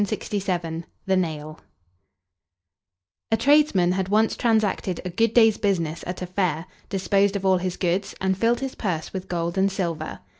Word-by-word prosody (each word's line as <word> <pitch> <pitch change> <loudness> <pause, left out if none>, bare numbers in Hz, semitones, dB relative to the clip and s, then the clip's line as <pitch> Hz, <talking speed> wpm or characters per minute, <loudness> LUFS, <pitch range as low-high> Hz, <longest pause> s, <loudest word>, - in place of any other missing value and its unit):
THE 185 -6 -2 0.3
NAIL 155 -4 -3 1.7
A 225 - +4
tradesman 250 -9 +4
had 190 0 -1
once 220 +2 +3
transacted 215 -6 +1
a 180 - -3
good 225 +5 +2
day's 225 -3 +5
business 170 -6 -1
at 180 +1 -4
a - - -2
fair, 180 -3 -1 0.2
disposed 195 +1 +1
of 195 -1 -2
all 190 -1 +4
his 180 0 -3
goods, 185 +2 -1
and 190 0 +1
filled 235 +5 +1
his 270 -1 -3
purse 170 -7 -3
with 190 -1 -5
gold 170 +1 -1
and 195 +1 +3
silver. 170 -5 -3
190 Hz, 155 wpm, -24 LUFS, 175-205 Hz, 1.7 s, day's